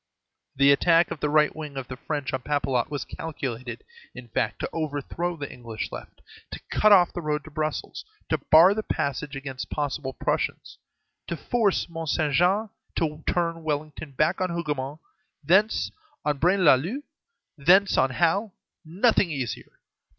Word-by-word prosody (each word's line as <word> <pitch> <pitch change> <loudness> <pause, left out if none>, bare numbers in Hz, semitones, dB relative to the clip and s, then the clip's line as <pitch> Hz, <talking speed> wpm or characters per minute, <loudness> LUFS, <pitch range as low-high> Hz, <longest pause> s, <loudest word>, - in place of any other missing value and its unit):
The 140 +1 +5
attack 165 +4 +4
of - - -4
the 150 - 0
right 150 0 +3
wing 150 -3 -7
of 130 -2 -5
the 130 - -6
French 140 0 -4
on 130 - -1
Papelotte 135 -4 0
was 145 -1 -4
calculated, 130 -6 -6 0.3
in 120 -2 -10
fact, - - -1
to - - -2
overthrow 160 +3 -3
the 145 -2 -6
English 115 -3 -6
left, - - -10 0.3
to - - -7
cut 215 - +4
off 180 -4 +6
the 175 - -4
road 150 -2 -1
to 155 - -12
Brussels, 155 +1 -3 0.3
to 160 - +1
bar 165 +7 +6
the 220 - -2
passage 140 -6 -3
against 135 -2 -6
possible 145 -2 -3
Prussians, - - -2 0.5
to 170 - -3
force 215 - +1
Mont 165 -2 -5
Saint 150 -3 +1
Jean, 190 - +3 0.3
to 155 -2 -2
turn 165 -1 0
Wellington 150 -1 -4
back 155 +7 +1
on 185 - +1
Hougomont, 150 -3 -3 0.4
thence 190 +8 +3 0.3
on 145 -2 0
Braine 185 +4 +3
l'Alleud, 165 - +3 0.5
thence 185 +7 +4
on 130 - +3
Hal; 180 - +1 0.3
nothing 190 +4 +2
easier. 135 -7 -4
155 Hz, 160 wpm, -26 LUFS, 140-175 Hz, 0.5 s, off